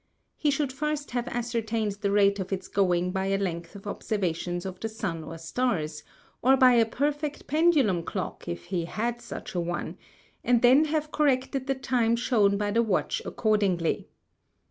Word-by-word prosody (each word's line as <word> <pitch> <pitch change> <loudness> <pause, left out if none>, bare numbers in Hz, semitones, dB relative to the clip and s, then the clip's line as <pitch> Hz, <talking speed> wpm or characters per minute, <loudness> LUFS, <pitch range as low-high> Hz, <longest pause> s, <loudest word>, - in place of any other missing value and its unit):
He 300 - +1
should 280 -1 0
first 300 +1 -3
have 245 0 -2
ascertained 230 -3 -1
the 200 - +1
Rate 200 0 +3
of 190 - -4
its 190 -1 -3
going 180 -2 +1
by 190 0 -1
a 195 0 +1
Length 170 -3 -4
of 200 - -11
Observations 175 -4 -2
of 185 -1 -6
the 225 - -3
Sun 195 -8 -4
or 165 - -8
Stars, 165 -4 -2 0.4
or 265 +2 +5
by 255 -1 +7
a 230 -2 +4
perfect 290 +4 -2
Pendulum 290 - +3
Clock 165 - -5
if 85 0 -4
he 175 -3 -2
had 235 +6 -3
such - - -7
a 180 - -1
one, 175 0 -4 0.4
and 245 -1 +3
then 265 +5 +6
have 305 0 -1
corrected 270 -2 +1
the 270 - +1
Time 240 -3 +1
shewn 215 -4 +2
by 205 0 -1
the 230 +3 +3
Watch 215 -6 0
accordingly. 200 -6 0
220 Hz, 175 wpm, -27 LUFS, 185-255 Hz, 0.4 s, by